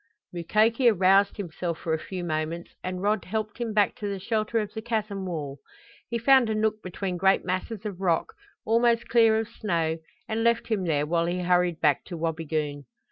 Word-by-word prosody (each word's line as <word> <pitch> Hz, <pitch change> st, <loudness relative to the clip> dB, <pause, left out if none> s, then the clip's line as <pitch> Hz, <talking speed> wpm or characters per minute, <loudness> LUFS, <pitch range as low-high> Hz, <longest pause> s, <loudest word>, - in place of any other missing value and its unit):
Mukoki 220 Hz, +8 st, +3 dB
aroused 195 Hz, 0 st, +4 dB
himself 175 Hz, -3 st, -4 dB
for 160 Hz, -, -2 dB
a 160 Hz, -, 0 dB
few 185 Hz, +2 st, -6 dB
moments 160 Hz, +1 st, -3 dB
and 185 Hz, 0 st, -4 dB
Rod 210 Hz, 0 st, +1 dB
helped 215 Hz, +3 st, -4 dB
him 235 Hz, -2 st, -2 dB
back 210 Hz, -1 st, +3 dB
to 210 Hz, -, -4 dB
the 200 Hz, -1 st, -3 dB
shelter 215 Hz, +3 st, -1 dB
of 210 Hz, -2 st, -2 dB
the 220 Hz, -, -5 dB
chasm 215 Hz, -4 st, -2 dB
wall. 145 Hz, -5 st, -5 dB, 0.5 s
He 235 Hz, -, -1 dB
found 255 Hz, 0 st, +5 dB
a 220 Hz, -, 0 dB
nook 215 Hz, 0 st, 0 dB
between 185 Hz, 0 st, -4 dB
great 190 Hz, +2 st, +3 dB
masses 185 Hz, +4 st, -3 dB
of 195 Hz, -3 st, -5 dB
rock, 170 Hz, -4 st, +1 dB, 0.3 s
almost 235 Hz, +1 st, +2 dB
clear 225 Hz, -2 st, +5 dB
of 220 Hz, -1 st, -1 dB
snow, 165 Hz, -7 st, -1 dB, 0.3 s
and 225 Hz, +1 st, -1 dB
left 235 Hz, 0 st, +2 dB
him 205 Hz, -5 st, 0 dB
there 150 Hz, -3 st, +1 dB
while 170 Hz, +2 st, +1 dB
he 180 Hz, +1 st, -1 dB
hurried 180 Hz, -1 st, +2 dB
back 150 Hz, -3 st, +3 dB
to 175 Hz, -, -7 dB
Wabigoon. 155 Hz, -3 st, -2 dB
195 Hz, 190 wpm, -26 LUFS, 170-220 Hz, 0.5 s, found